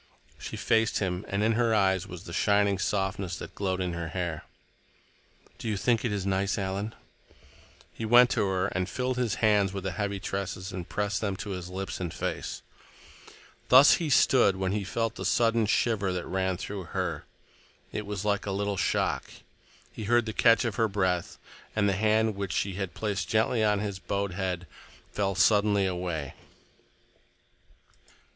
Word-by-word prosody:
She - - -6
faced 110 -1 +2
him, 95 -1 -2
and 100 +1 -1
in 110 - +3
her 115 0 +2
eyes 95 -3 +2
was 90 -2 -9
the 85 - -9
shining 100 0 +2
softness 95 -2 -1
that - - -8
glowed 95 -2 -2
in 90 -2 -2
her 85 -1 -4
hair. 85 -2 -4 1.1
"Do - - -5
you 105 - -1
think 115 +3 +1
it 120 - 0
is 100 -2 -2
nice, 100 +1 0
Alan?" 100 +2 -3 1.0
He - - -7
went 120 +2 +6
to - - +1
her 95 0 0
and 90 +1 -2
filled 130 +2 -2
his 120 -5 0
hands 100 -3 +3
with 95 -2 -4
the 95 - -2
heavy 100 +2 -2
tresses 95 0 -4
and 90 -2 -6
pressed 105 -3 -1
them 100 -3 -1
to 105 0 -6
his 90 -2 -5
lips 95 +1 -5
and 90 -3 -3
face. 90 - -4 1.1
Thus 130 +4 +8
he 165 -3 -2
stood 125 -7 +4
when 95 -1 -1
he 105 0 -1
felt 115 +4 -2
the - - -5
sudden 115 -2 +2
shiver 105 -3 +1
that 90 -1 -3
ran 95 -1 -1
through 100 0 -6
her. 85 -4 -3 0.7
It 105 -1 -4
was 105 -1 -4
like 105 0 0
a - - -1
little 100 0 -1
shock. - - 0 0.6
He 110 - -7
heard 120 +2 +3
the 110 - -4
catch 115 +1 +4
of 110 -4 -2
her 115 - +3
breath, 95 -4 -1 0.4
and 105 -2 +2
the 100 - +2
hand 110 +2 +2
which 100 -1 -3
she 100 -1 -1
had 95 -1 -4
placed 105 -3 -2
gently 110 +1 +2
on 105 -1 +3
his 100 -2 -3
bowed 100 0 -2
head 90 -2 -3 0.5
fell 100 -2 -1
suddenly 100 +1 +4
away. 90 -6 -3
100 Hz, 180 wpm, -28 LUFS, 95-110 Hz, 1.1 s, Thus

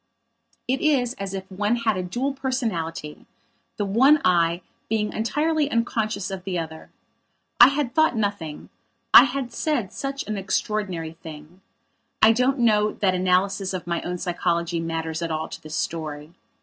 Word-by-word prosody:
It 260 +2 0
is 260 -6 +2
as 195 0 -4
if 190 - -4
one 205 +4 0
had 230 -3 0
a 185 - -2
dual 245 +10 -2
personality, 215 - -3 0.5
the 205 - -1
one 265 +10 +5
I 170 -1 +3 0.3
being 210 -1 0
entirely 300 +6 0
unconscious 225 -5 -1
of 190 -1 -6
the 185 -2 -3
other. 160 -1 -6 0.7
I 240 - +11
had 275 -3 -1
thought 315 -5 +3
nothing; 200 -8 -3 0.4
I - - +11
had 255 -2 -4
said 250 - -1
such 275 -1 -4
an 215 -1 -3
extraordinary 190 -4 -2
thing. 160 +2 -11 0.6
I 220 - +7
don't 255 +4 +2
know 215 -3 +3
that 190 -2 +1
analysis 185 +1 +1
of 180 - -5
my 170 0 -2
own 180 0 -4
psychology 170 -1 -1
matters 165 0 -3
at 170 - -2
all 160 0 -2
to - - -9
this 155 0 -7
story. 155 -1 -4
195 Hz, 160 wpm, -24 LUFS, 170-240 Hz, 0.7 s, I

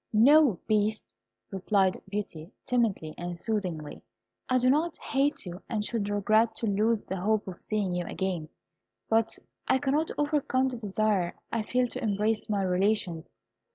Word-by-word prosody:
"No, 255 - +6
Beast," 215 0 0 0.4
replied 195 0 +1
Beauty, 195 -4 -5
timidly 220 -11 0
and 175 0 -5
soothingly; 180 -9 -3 0.5
"I 255 - +4
do 255 0 +2
not 310 +5 +2
hate 275 -2 0
you, 180 +2 -7
and 215 -3 -1
should 215 -3 -2
regret 215 +2 +2
to 230 - -3
lose 215 +2 +1
the 190 - -4
hope 215 +1 +1
of 180 -2 -8
seeing 205 -4 -1
you 175 0 -2
again; 180 -5 -3 0.6
but 225 0 +2 0.3
I - - +4
cannot 290 +4 0
overcome 290 -3 +1
the 250 - -5
desire 205 -4 0 0.2
I 230 - 0
feel 250 +3 +1
to - - -6
embrace 215 +1 0
my 200 -2 +1
relations. 185 -2 0
215 Hz, 155 wpm, -28 LUFS, 190-235 Hz, 0.6 s, No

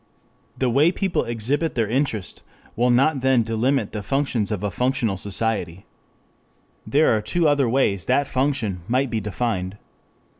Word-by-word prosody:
The 130 - 0
way 145 +7 +4
people 190 -1 -1
exhibit 125 +8 -1
their 115 -3 +1
interest 115 -5 -2 0.3
will 120 +2 +2
not 135 +3 +3
then 130 -2 +3
delimit 115 +5 0
the 105 - -4
functions 125 -2 -1
of 105 -2 -3
a 105 - -1
functional 125 -4 0
society. 95 -2 -2 1.0
There 145 -4 +3
are 110 - 0
two 170 +8 +1
other 145 -4 +2
ways 105 -8 +1
that 145 - +2
function 130 -10 -1
might 130 +1 0
be 110 - 0
defined. 105 -2 -3
120 Hz, 150 wpm, -22 LUFS, 105-135 Hz, 1.0 s, way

